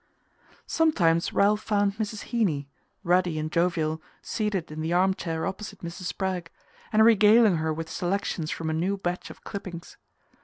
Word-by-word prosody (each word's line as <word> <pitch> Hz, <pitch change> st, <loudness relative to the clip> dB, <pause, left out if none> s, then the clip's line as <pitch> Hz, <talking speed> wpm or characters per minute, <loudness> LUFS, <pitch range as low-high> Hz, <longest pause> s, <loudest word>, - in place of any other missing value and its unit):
Sometimes 175 Hz, -, +2 dB
Ralph 210 Hz, +1 st, +3 dB
found 205 Hz, -1 st, +1 dB
Mrs. 215 Hz, -1 st, -4 dB
Heeny, 175 Hz, -, 0 dB, 0.4 s
ruddy 175 Hz, -2 st, +2 dB
and 155 Hz, 0 st, -3 dB
jovial, 160 Hz, -2 st, 0 dB, 0.2 s
seated 210 Hz, -7 st, -2 dB
in 155 Hz, +1 st, -5 dB
the 160 Hz, +1 st, -2 dB
arm 185 Hz, +2 st, +3 dB
chair 165 Hz, -3 st, -3 dB
opposite 200 Hz, +1 st, -6 dB
Mrs. 170 Hz, +2 st, -7 dB
Spragg, 180 Hz, -2 st, -2 dB, 0.4 s
and 220 Hz, -1 st, +5 dB
regaling 220 Hz, -3 st, +6 dB
her 160 Hz, 0 st, -1 dB
with 160 Hz, +1 st, -4 dB
selections 175 Hz, -1 st, -2 dB
from 160 Hz, -1 st, -3 dB
a -, -, -1 dB
new 185 Hz, +5 st, 0 dB
batch 180 Hz, -2 st, -3 dB
of -, -, -13 dB
clippings. 180 Hz, -4 st, -7 dB
180 Hz, 155 wpm, -26 LUFS, 165-205 Hz, 0.4 s, regaling